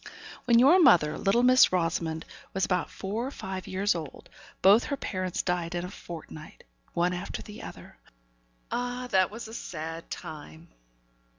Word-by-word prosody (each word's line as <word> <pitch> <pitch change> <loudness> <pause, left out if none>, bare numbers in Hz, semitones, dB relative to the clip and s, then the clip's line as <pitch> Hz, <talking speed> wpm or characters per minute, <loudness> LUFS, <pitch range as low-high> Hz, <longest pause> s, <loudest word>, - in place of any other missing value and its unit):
When 235 -2 +5
your 280 +10 +7
mother, 155 - +5
little 220 +5 +2
Miss 255 +1 +6
Rosamond, 165 -2 -1 0.3
was 190 -1 +2
about 180 -2 0
four 215 +6 -4
or - - -3
five 190 -8 -6
years 195 +2 +1
old, 160 -5 -8 0.3
both 205 +5 +7
her 280 - -2
parents 185 -7 -3
died 175 -1 -1
in 175 0 -2
a 180 - -8
fortnight 160 -4 -10 0.3
one 175 +1 +1
after 180 +2 -5
the 210 - -10
other. - - -11 0.7
Ah! 245 +1 -2
that 185 -2 +4
was 225 +2 -8
a 220 - -10
sad 165 -5 -6
time. 160 +2 -9
185 Hz, 160 wpm, -28 LUFS, 170-225 Hz, 0.7 s, your